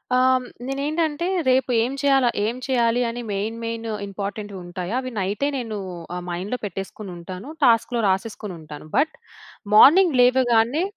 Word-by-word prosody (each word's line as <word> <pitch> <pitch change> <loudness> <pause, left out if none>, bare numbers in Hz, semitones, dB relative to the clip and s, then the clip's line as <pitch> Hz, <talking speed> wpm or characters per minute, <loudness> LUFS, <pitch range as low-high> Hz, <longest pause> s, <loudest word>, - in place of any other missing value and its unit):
ఆహ్, 255 0 +4 0.2
నేనేంటంటే 300 +4 -1 0.2
రేపు 260 +1 +3
ఏం 255 +3 -2
చెయ్యాల 270 -3 +4 0.2
ఏం 225 +3 -1
చెయ్యాలి 245 -2 +2
అని 240 +1 -4
మెయిన్ 210 +3 -2
మెయిన్ 230 0 -4 0.2
ఇంపార్టంట్‌వి 200 0 -5
ఉంటాయా, 175 +3 -5
అవి 255 - -6
నైటే 200 +8 -1
నేనూ 225 -5 -4 0.4
ఆహ్, 180 - -5
మైండ్‌లో 190 +8 -3
పెట్టేసుకొని 195 +1 -6
ఉంటాను. 185 - -8
టాస్క్‌లో 235 0 +3
రాసేసుకొని 195 0 -3
ఉంటాను. 150 -1 -10
బట్ 305 +4 +2 0.6
మార్నింగ్ 315 - +7
లేవగానే 245 +3 +3
230 Hz, 135 wpm, -23 LUFS, 200-260 Hz, 0.6 s, మార్నింగ్